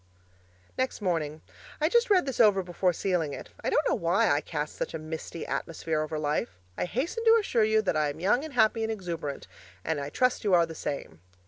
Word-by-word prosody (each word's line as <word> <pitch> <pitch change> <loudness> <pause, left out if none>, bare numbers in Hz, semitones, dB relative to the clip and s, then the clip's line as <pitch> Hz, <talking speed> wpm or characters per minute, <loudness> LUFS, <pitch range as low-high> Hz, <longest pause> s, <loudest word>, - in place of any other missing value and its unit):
Next 260 0 -1
morning 160 -6 -1 0.4
I 310 - +3
just 475 +7 +3
read 375 -6 +4
this 270 -3 -4
over 205 -4 +5
before 180 +1 +1
sealing 170 -4 -1
it. - - -8
I - - 0
don't - - +2
know - - +2
WHY - - +2
I - - +2
cast - - -4
such - - -4
a - - -1
misty 160 +1 -6
atmosphere 160 -1 -2
over 155 0 -3
life. 145 - -2 0.2
I - - -1
hasten 320 - -2
to 455 0 +7
assure 245 - +1
you 220 0 +3
that 185 - 0
I 150 -1 +2
am 145 +2 -7
young 210 - +2
and 315 -2 -7
happy 225 -1 +3
and 220 0 -1
exuberant; 170 -9 -5 0.4
and 160 -2 0
I 140 0 -4
trust 250 - +1
you 200 -4 +4
are 170 -1 +5
the 165 - -8
same. 110 - -5
185 Hz, 220 wpm, -28 LUFS, 155-250 Hz, 0.4 s, to